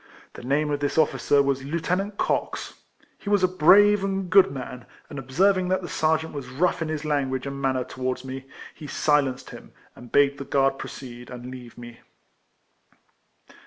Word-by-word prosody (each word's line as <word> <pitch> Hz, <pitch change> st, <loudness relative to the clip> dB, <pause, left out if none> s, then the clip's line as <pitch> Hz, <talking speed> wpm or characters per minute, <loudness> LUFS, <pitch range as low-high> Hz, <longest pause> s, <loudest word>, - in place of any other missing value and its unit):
The -, -, -10 dB
name 145 Hz, +4 st, 0 dB
of 145 Hz, -, -1 dB
this 145 Hz, +1 st, -2 dB
officer 145 Hz, -2 st, +3 dB
was 135 Hz, -1 st, -1 dB
Lieutenant 180 Hz, +7 st, -2 dB
Cox; -, -, -2 dB, 0.5 s
he 200 Hz, -, -6 dB
was 205 Hz, -2 st, +3 dB
a -, -, +6 dB
brave 195 Hz, +4 st, +5 dB
and 195 Hz, -2 st, -2 dB
good 195 Hz, 0 st, +7 dB
man, 125 Hz, -2 st, -8 dB, 0.2 s
and 145 Hz, -, -5 dB
observing 180 Hz, +8 st, +2 dB
that 185 Hz, 0 st, 0 dB
the -, -, -5 dB
sergeant 160 Hz, 0 st, 0 dB
was 140 Hz, -4 st, -6 dB
rough 165 Hz, +7 st, 0 dB
in 165 Hz, -, -1 dB
his 155 Hz, -1 st, -4 dB
language 135 Hz, -3 st, -1 dB
and 140 Hz, 0 st, -5 dB
manner 130 Hz, -2 st, 0 dB
towards 130 Hz, 0 st, -4 dB
me, 135 Hz, 0 st, -7 dB, 0.3 s
he 150 Hz, -, -10 dB
silenced 140 Hz, -4 st, 0 dB
him, -, -, -12 dB, 0.2 s
and 120 Hz, -, -13 dB
bade 140 Hz, 0 st, +3 dB
the -, -, -4 dB
guard 135 Hz, 0 st, +1 dB
proceed, 120 Hz, -2 st, -9 dB
and 125 Hz, 0 st, -8 dB
leave 125 Hz, -2 st, -11 dB
me. 120 Hz, -1 st, -11 dB
140 Hz, 175 wpm, -25 LUFS, 130-170 Hz, 0.5 s, good